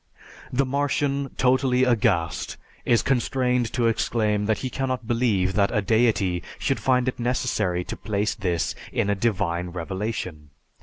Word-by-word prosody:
The 135 +2 +2
Martian, 140 0 0
totally 130 0 +3
aghast, 105 - +1 0.3
is 120 -1 +3
constrained 125 -2 +1
to 120 -2 +1
exclaim 110 -2 +1
that 110 -2 +2
he - - -1
cannot 130 -3 -2
believe 110 -6 +1
that 100 -1 +3
a 105 -4 0
Deity 105 -5 +2 0.2
should 135 - 0
find 125 -1 +2
it 130 - -2
necessary 115 -7 0
to - - -6
place 105 0 -1
this 90 -7 -1 0.2
in 100 - +1
a - - +3
divine 90 -5 0
revelation. 90 -3 -4
115 Hz, 145 wpm, -24 LUFS, 95-125 Hz, 0.3 s, totally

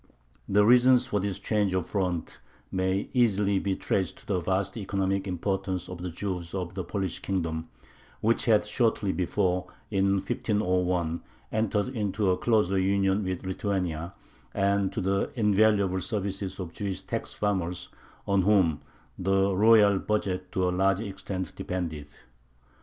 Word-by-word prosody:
The 105 +1 +4
reasons 125 +2 +6
for 105 -4 -1
this 100 -1 -2
change 105 -4 0
of 90 -3 -1
front 90 -5 -2 0.3
may 95 +1 0
easily 105 -5 +3
be 95 -1 -1
traced 95 -3 -1
to - - -15
the 95 -3 0
vast 95 +3 -1
economic 100 -2 -1
importance 95 0 -2
of 90 -1 -7
the 90 +1 -4
Jews 90 0 -4
of 90 -2 -3
the 95 -1 -3
Polish 95 -1 -3
Kingdom, 80 -4 -2 0.5
which 115 +2 +1
had 110 -3 +4
shortly 105 -3 +1
before, 90 0 0 0.2
in 95 -1 +2
1501, 90 -4 0 0.3
entered 110 0 0
into 105 -5 0
a 90 - +1
closer 105 -5 +2
union 95 +1 +2
with 95 -1 -3
Lithuania, 90 -3 -2 0.4
and 100 -1 +2
to 110 - -3
the 100 +1 0
invaluable 105 -4 +3
services 100 -3 -3
of 90 -3 -4
the - - -22
Jewish 100 -2 -4
tax - - -4
farmers, 95 -4 -1 0.4
on 100 -1 +2
whom 95 -6 +3 0.4
the 95 +1 +2
royal 105 -1 +6
budget 95 -4 -2
to 95 -1 +1
a - - +1
large 95 +2 +2
extent 95 -3 -5
depended. 80 -5 -4
95 Hz, 145 wpm, -27 LUFS, 90-105 Hz, 0.5 s, reasons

